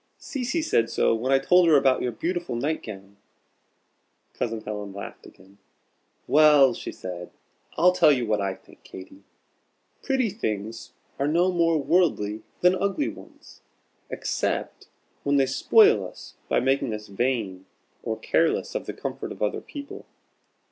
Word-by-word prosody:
"Cecy 270 +2 -3
said 115 - +1
so - - +2
when 120 +4 -1
I 135 - +6
told 180 +5 +4
her 155 -3 +6
about 135 -2 +3
your 125 - -1
beautiful 170 +3 -3
night 145 +7 -1
gown." 100 -1 -10 1.2
Cousin 115 -2 -3
Helen 105 -2 -6
laughed 100 - -9
again. 95 +2 -19 0.7
"Well," 150 -3 +6
she - - -7
said, 90 -1 -8 0.5
"I'll 180 +1 +5
tell 175 -4 +5
you 125 -4 +1
what 105 -2 0
I 95 -1 -2
think, - - -21
Katy. 95 +1 -12 0.8
Pretty 260 -6 0
things 110 - -5 0.3
are 140 - +1
no 175 +4 +2
more 165 -2 +2
'worldly' 135 - +1 0.2
than 180 +1 +5
ugly 200 +9 -1
ones, - - -14 0.5
except - - -3 0.3
when 140 0 0
they 135 - +4
spoil 420 - +4
us - - -13 0.2
by - - +3
making 130 -3 0
us 105 0 -8
vain, 100 -4 -2 0.3
or 110 - -3
careless 160 +8 0
of - - -4
the - - -4
comfort - - -6
of - - -5
other - - -1
people. 285 -1 -9
135 Hz, 150 wpm, -25 LUFS, 105-175 Hz, 1.2 s, I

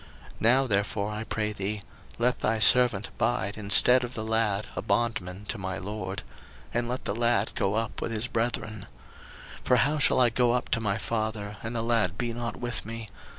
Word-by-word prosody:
01:044:033 - - -21
Now 125 +4 +4
therefore, 100 -1 -1
I 105 +1 -4
pray 105 -1 -2
thee, 105 +1 -3 0.4
let 125 +1 +1
thy 110 +1 0
servant 115 -1 +5
abide 105 -4 -1
instead 110 +5 +6
of 120 0 -6
the 110 - -3
lad 110 -2 0
a - - -2
bondman 100 -3 -2
to 115 - -3
my 95 -1 -4
lord; 95 +1 -5 0.5
and 120 0 -1
let 125 +1 -4
the - - -1
lad 115 -2 +1
go 100 +1 -1
up 115 -1 -3
with - - -3
his 110 +1 -1
brethren. 115 -3 -3 0.7
01:044:034 - - -23
For 125 - +4
how 145 +6 +2
shall 145 - +4
I 125 -2 +5
go 120 0 +2
up 125 - -2
to - - +1
my 105 -3 -1
father, 110 -2 -3
and 115 +1 -5
the 115 - -1
lad 115 -6 +1
be 120 -1 -2
not 115 -2 -5
with 120 -2 -3
me? 115 0 -7
110 Hz, 200 wpm, -27 LUFS, 105-120 Hz, 0.7 s, instead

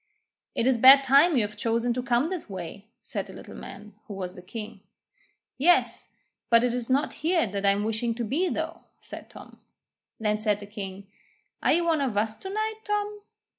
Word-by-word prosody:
'It 230 - 0
is 260 -1 +3
a - - -8
bad 270 +3 +9
time 280 +5 +5
you 230 - +4
have 210 0 -5
chosen 235 0 0
to 250 - -2
come 245 +5 +1
this 365 - -5
way,' 195 +2 -7 0.2
said - - -4
the - - -11
Little - - -11
Man, 210 +1 -10
who 205 - -7
was 180 -2 -5
the 180 - -11
king. 215 +3 -8 0.8
'Yes; 350 +6 +2 0.4
but 230 0 +5
it 245 -1 +1
is 245 -1 -4
not 275 +3 +1
here 335 -2 +2
that 200 -1 -2
I'm 200 +1 +3
wishing 225 +2 -1
to 240 - -3
be 310 - 0
though,' 325 +1 -4 0.2
said - - -10
Tom. - - -14 0.6
Then 210 -1 0
said 210 -2 +1
the 205 - -9
king: 200 -1 -7 0.6
'Are - - +3
you 340 +2 +2
one 320 -3 +2
of 250 -7 -1
us 215 +1 0
to 385 - -7
night, 435 +2 -2
Tom?' 415 0 -2
235 Hz, 205 wpm, -26 LUFS, 210-310 Hz, 0.8 s, bad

